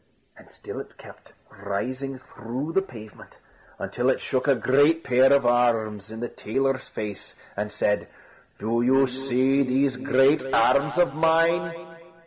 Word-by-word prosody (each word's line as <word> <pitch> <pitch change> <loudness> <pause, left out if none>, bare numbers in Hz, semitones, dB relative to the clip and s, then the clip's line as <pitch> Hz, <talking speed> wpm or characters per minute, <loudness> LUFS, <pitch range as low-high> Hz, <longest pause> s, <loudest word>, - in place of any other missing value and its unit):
And - - -18
still - - -9
it - - -11
kept - - -15 0.3
rising 130 +7 -4
through 130 +4 -7
the 195 - +3
pavement, 110 - -13 0.4
until 125 +1 -2
it 130 - +1
shook 130 +1 -2
a 140 - +4
great 145 +7 +2
pair 130 +1 +4
of 140 -2 +4
arms 115 -4 +1
in 110 +1 -8
the 120 - -2
tailor's 135 +5 -2
face, 105 -1 -7 0.2
and 105 +1 -4
said: 105 0 -1 0.5
"Do 115 +3 -1
you 135 +2 +4
see 135 +1 0
these 135 0 +1
great 135 +2 +3
arms 140 +7 +2
of 175 -5 +2
mine?" 165 +1 0
130 Hz, 145 wpm, -24 LUFS, 115-140 Hz, 0.5 s, a